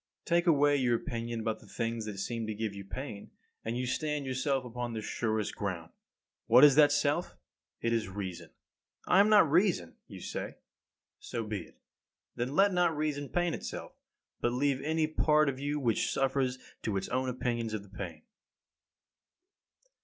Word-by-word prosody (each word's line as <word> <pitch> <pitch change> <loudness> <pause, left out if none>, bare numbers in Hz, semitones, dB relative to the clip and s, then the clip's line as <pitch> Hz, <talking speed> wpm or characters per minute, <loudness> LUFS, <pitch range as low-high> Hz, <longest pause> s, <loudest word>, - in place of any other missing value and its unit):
40. 170 - +2
Take 175 - -11
away 145 -2 +5
your 125 -3 +2
opinion 115 -2 -3
about 110 0 -2
the - - -17
things 115 -1 -3
that 105 -2 -5
seem 115 +3 -3
to 110 - -3
give 110 -1 -3
you 100 0 -7
pain, 100 0 -7 0.3
and 115 +2 -2
you 125 - -1
stand 150 +2 -1
yourself 130 0 0
upon 120 0 -4
the 110 - -3
surest 110 -2 -1
ground. 90 -5 -4 0.6
What 125 +4 +7
is 145 -2 +9
that 145 0 +6
self? 145 +4 +1 0.5
It 115 0 +1
is 110 -4 0
reason. 95 -2 -6 0.6
I 185 - +5
am 205 +1 +6
not 210 -5 +7
reason, 165 - +2
you - - -10
say. - - -5 0.6
So 115 -2 -4
be 105 -2 -3
it; - - -23 0.6
then 125 +4 -2
let 200 +2 +5
not 175 -3 +2
reason 145 -2 -2
pain 175 -1 0
itself, 65 - -6 0.5
but 120 - 0
leave 135 +1 +1
any 160 +2 +1
part 155 -1 +3
of 135 -1 -1
you 145 +1 -1
which 120 -5 +1
suffers 135 -1 +1 0.2
to 105 -3 -1
its 95 - -3
own 130 0 0
opinions 120 -3 -2
of 105 - -5
the 100 - -17
pain. 85 -5 -6
125 Hz, 175 wpm, -31 LUFS, 110-145 Hz, 0.6 s, is